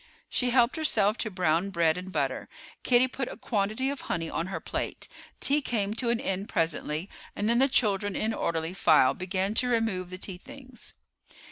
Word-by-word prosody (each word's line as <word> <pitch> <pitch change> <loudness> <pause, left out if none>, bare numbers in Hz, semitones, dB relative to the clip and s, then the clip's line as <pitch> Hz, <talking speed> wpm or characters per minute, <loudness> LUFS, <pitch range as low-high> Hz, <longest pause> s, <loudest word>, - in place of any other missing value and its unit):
She 250 - +1
helped 245 +3 +3
herself 215 -9 +2
to 220 - 0
brown 180 -1 +1
bread 170 -4 +2
and 185 +1 -7
butter. - - -2 0.3
Kitty 250 +1 +4
put 260 0 -4
a - - -9
quantity 220 +5 -1
of 280 - -5
honey 165 -1 -3
on 165 - -2
her 190 - -4
plate. - - -4 0.3
Tea 290 +2 +2
came 210 -6 -1
to 235 +1 -1
an 235 -1 +1
end 195 +3 -3
presently, 160 +1 -1 0.3
and 205 - -1
then 235 +1 +3
the 270 - +5
children 205 -6 +1
in 220 +1 0
orderly 165 -3 -2
file 155 -8 +5
began 190 +2 -2
to 250 +3 +2
remove 220 -6 0
the 185 - -6
tea 185 -1 -6
things. 260 +3 -12
200 Hz, 190 wpm, -28 LUFS, 180-240 Hz, 0.3 s, the